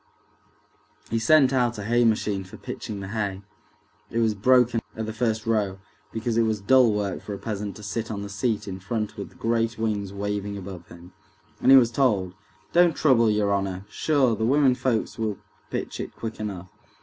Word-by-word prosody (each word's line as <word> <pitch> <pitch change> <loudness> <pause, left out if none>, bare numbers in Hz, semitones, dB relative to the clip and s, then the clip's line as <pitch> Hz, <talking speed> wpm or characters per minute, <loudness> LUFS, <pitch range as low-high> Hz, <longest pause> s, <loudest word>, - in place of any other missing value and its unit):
He 115 - +1
sent 135 +2 +5
out 120 -3 +1
a 105 - -5
hay 120 +3 +2
machine 105 -3 +1
for 95 - -12
pitching 100 -2 -6
the 95 - -6
hay—it 105 +2 -7
was 115 -2 +2
broken 120 +2 +3 0.2
at 110 - -2
the 110 - -5
first 110 -1 -1
row 105 -4 0 0.3
because 115 +1 -2
it - - +5
was 110 -2 +1
dull 125 +3 +5
work 105 -2 -2
for 105 - -6
a - - -7
peasant 105 -1 -4
to 105 - -11
sit 110 +2 -3
on 100 -2 -4
the - - -5
seat 105 +2 -2
in 95 -1 -5
front 105 +2 -3
with 100 - -6
the - - -22
great 115 0 0
wings 105 -3 -2
waving 100 0 -3
above 95 -3 -8
him. 85 +1 -14 0.5
And - - +3
he 135 - +10
was 120 -3 +5
told, 105 -9 +1 0.4
"Don't 175 -1 +5
trouble, 120 -6 +4
your 105 -1 +2
honor, 95 -1 -2
sure, 135 -7 +2
the 110 - -3
womenfolks 130 -3 +2
will 110 -2 -1 0.3
pitch - - -4
it - - -6
quick 115 -1 -6
enough." 95 -4 -5
110 Hz, 190 wpm, -25 LUFS, 100-115 Hz, 0.5 s, he